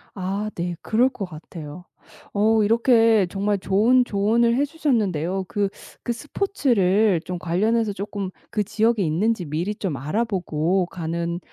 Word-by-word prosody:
아 195 +3 -2
네 175 0 -3
그럴 245 +4 +2
것 200 - -5
같아요. 160 0 -10 0.5
어 215 +1 +3
이렇게 225 -2 +4
정말 200 +1 -1
좋은 225 +7 +3
조언을 230 +3 +2
해 280 +3 +2
주셨는데요. 200 - -1
그 205 0 0 0.3
그 - - -1
스포츠를 220 - +1
좀 180 -1 -4
관련해서 210 +5 +1
쪼끔 200 -1 -4 0.2
그 210 - 0
지역에 220 0 +1
있는지 180 +4 0
미리 170 +8 -2
좀 185 -9 -3
알아보고 180 - 0
가는 170 0 -3
200 Hz, 280 characters per minute, -23 LUFS, 180-225 Hz, 0.5 s, 이렇게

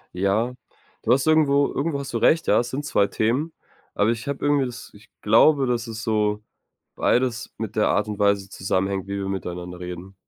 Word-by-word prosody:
Ja. 105 +6 0 0.5
Du 120 - +4
hast 135 +2 +1
irgendwo 145 -3 +4
irgendwo 140 0 -1
hast 135 -3 -7
du - - +1
recht. 160 +7 +3
Ja, - - +4
es 120 0 -2
sind 145 +3 -4
zwei 100 -7 +2
Themen, 130 +9 -1 0.4
aber 105 +2 +2
ich 115 +2 -5
habe 140 0 -4
irgendwie 145 -2 +3
das 120 -1 -8
ich 105 +1 -18
glaube, 135 +6 +5
dass 120 -1 -1
ist 110 -1 -6
so 105 -1 0 0.5
beides 120 -1 0
mit 110 -2 -5
der 105 - +3
Art 105 0 +1
und 105 0 -5
Weise 100 -1 +2
zusammenhängt, 95 0 -2
wie 100 0 -3
wir 95 0 -3
miteinander 90 -2 -5
reden. 90 +2 -8
110 Hz, 200 wpm, -23 LUFS, 100-135 Hz, 0.5 s, glaube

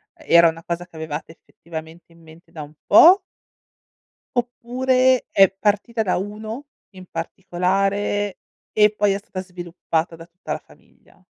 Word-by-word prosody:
uhm, 315 - -19
era 170 0 +7
una 165 0 -8
cosa 175 +1 -4
che 165 - -21
avevate, 160 0 -6
effettivamente, 165 +1 -11
in 165 0 -20
mente 160 +1 -18
da 155 -2 -7
un 150 +1 -13
po' 355 - +8 1.2
oppure, 255 +1 +1
è 195 -1 +6
partita 210 +3 -1
da 185 - 0
1 215 +7 -6 0.3
in 185 -2 -13
particolare, 195 +4 -1 0.3
e 210 0 +4
poi 205 -1 +2
è 195 - -1
stata 195 -2 -7
sviluppata 175 -2 -4
da 165 - -12
tutta 175 +2 -10
la - - -4
famiglia? - - -24
190 Hz, 150 wpm, -21 LUFS, 170-210 Hz, 1.2 s, po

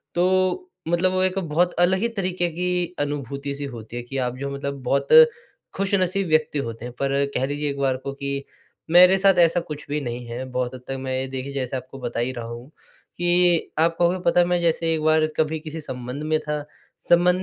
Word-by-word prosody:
तो 185 - +1 0.2
मतलब 175 +2 +2
वो 185 0 +1
एक 185 +1 +1
बहुत 175 0 +1
अलग 180 +2 +4
ही 230 - +1
तरीके 180 -2 0
की 180 +1 -2
अनुभूति 140 -1 -3
सी 145 0 -5
होती 115 0 -9
है 120 - -4
कि 135 +3 -6
आप 125 -1 -1
जो 140 +1 -4
हैं 140 - -5
मतलब 140 0 -5
बहुत 140 +2 0 0.7
ख़ुशनसीब 195 -1 0
व्यक्ति 155 -2 +1
होते 115 0 -7
हैं। 125 - -7
पर 140 0 +1
कह 130 - +1
लीजिए 145 +1 -2
एक 140 - -4
बार 135 -2 +1
को 140 +1 -6
कि 140 0 -4 0.5
मेरे 180 +2 +8
साथ 195 0 +4
ऐसा 170 0 +4
कुछ 150 -4 -7
भी 150 +1 0
नहीं 120 -2 -5
है, 120 +2 -5
बहुत 125 -1 -3
हद 125 - -10
तक 135 - -3
मैं 130 0 -3
ये 130 - -2
देखिए 135 +1 -5
जैसे 130 -1 -2
आपको 130 +2 -10
बता 120 -2 -4
ही 120 +2 0
रहा 120 -2 -6
हूँ 120 +3 -9 0.5
कि 175 -1 +3
आप 165 +1 +3
कहोगे 175 +1 +2
पता 170 +1 +4
है 175 - +5
मैं 175 0 +1
जैसे 165 -1 +2
एक 160 - -1
बार 155 0 +4
कभी 160 0 0
किसी 155 +1 -7
संबंध 125 0 -6
में 155 0 +1
था, 150 -1 -3 0.5
संबंध 180 +1 +4
150 Hz, 220 wpm, -23 LUFS, 135-175 Hz, 0.7 s, मेरे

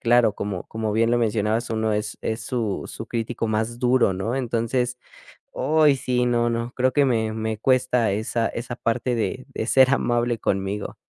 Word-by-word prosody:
claro, 120 -2 +4
como 100 -3 -4
como 110 -1 -3
bien 115 +2 +2
lo 120 - +3
mencionabas, 110 0 0
uno 110 -1 0
es 105 +1 -2
es 110 +1 -2
su 115 -3 -2
su 115 - -8
crítico 115 0 -3
más 110 +2 -1
duro, 125 -5 +3
¿no? 100 +6 -2
Entonces, 125 0 -1 0.6
ay, 155 -2 +3
sí, 125 -1 0
no, 120 -1 +2
no. 115 +1 -3
Creo 130 0 +1
que 140 +1 +3
me 110 -3 +1
me 110 0 -2
cuesta 125 -3 +2
esa 110 +2 -1
esa 120 +1 -5
parte 120 +1 -1
de 120 +3 -2
de 135 -5 -4
ser 130 +2 +5
amable 120 -3 +1
conmigo. 100 +1 -2
115 Hz, 180 wpm, -23 LUFS, 110-125 Hz, 0.6 s, ser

